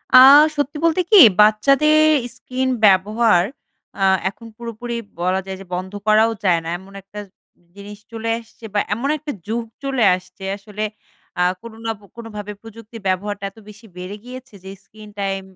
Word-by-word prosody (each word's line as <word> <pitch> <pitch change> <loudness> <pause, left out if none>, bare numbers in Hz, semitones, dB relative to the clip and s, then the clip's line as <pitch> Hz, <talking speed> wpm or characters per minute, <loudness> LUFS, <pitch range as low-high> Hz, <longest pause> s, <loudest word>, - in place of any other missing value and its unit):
আ - - +11 0.4
সত্যি 290 +1 -2
বলতে 335 +2 +2
কি? 415 - +9 0.2
বাচ্চাদের 275 +9 +4 0.4
screen 255 +2 -3 0.2
ব্যবহার 205 0 +4 0.6
আ - - +2 0.3
এখন 230 +3 -14
পুরোপুরি 235 0 -6 0.3
বলা 185 +2 +1
যায় 190 0 -6
যে - - -11
বন্ধ 185 +1 -5 0.2
করাও 215 +1 +4
যায় 175 -4 +3
না। 165 - -5
এমন 195 +1 -16
একটা 195 +2 -11 0.6
জিনিস 205 +1 -10
চলে 230 0 -4
আসছে 230 0 -15
বা 205 - +2
এমন 255 +6 -2
একটা 300 0 -6 0.2
যুগ 230 +2 -2 0.2
চলে 270 -3 0
আসছে 185 +1 -13
আসলে 210 +1 -7 0.6
আ - - +2 0.2
কোনো 230 -1 -11
না 225 - 0
পো 205 - -19
কোনোভাবে 210 -3 -7
প্রযুক্তির 225 0 -12
ব্যবহারটা 200 +2 -2
এত 210 - -34
বেশি 210 +2 -15
বেড়ে 180 +3 -7
গিয়েছে, 255 0 -11
যে 190 - -9
screen 215 0 -15
টাইম 195 -1 -2
215 Hz, 165 wpm, -20 LUFS, 195-235 Hz, 0.6 s, আ